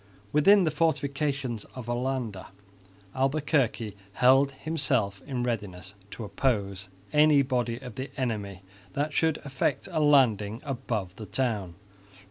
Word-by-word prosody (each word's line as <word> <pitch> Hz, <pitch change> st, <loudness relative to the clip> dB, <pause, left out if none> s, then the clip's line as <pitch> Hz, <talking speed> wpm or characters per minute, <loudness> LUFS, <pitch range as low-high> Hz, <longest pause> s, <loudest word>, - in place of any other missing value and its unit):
Within 195 Hz, +7 st, +6 dB
the 160 Hz, -, +1 dB
fortifications 140 Hz, -6 st, -1 dB
of 125 Hz, -3 st, -7 dB
Olinda, 120 Hz, -4 st, -2 dB, 0.7 s
Albuquerque 135 Hz, -6 st, 0 dB, 0.2 s
held 135 Hz, +4 st, +4 dB
himself 135 Hz, -10 st, -1 dB
in 130 Hz, -4 st, -2 dB
readiness 100 Hz, -6 st, -4 dB, 0.2 s
to 115 Hz, -, -7 dB
oppose 100 Hz, -3 st, -1 dB, 0.2 s
any 150 Hz, -1 st, +6 dB
body 125 Hz, -3 st, -1 dB
of 125 Hz, -2 st, -9 dB
the 130 Hz, +5 st, -5 dB
enemy 105 Hz, -7 st, -3 dB, 0.3 s
that 145 Hz, +2 st, -1 dB
should 160 Hz, -1 st, +2 dB
effect 135 Hz, 0 st, -1 dB
a 160 Hz, -, 0 dB
landing 115 Hz, -8 st, +3 dB
above 110 Hz, -9 st, -3 dB
the 110 Hz, -, -8 dB
town. 105 Hz, -9 st, -2 dB
130 Hz, 120 wpm, -28 LUFS, 105-140 Hz, 0.7 s, Within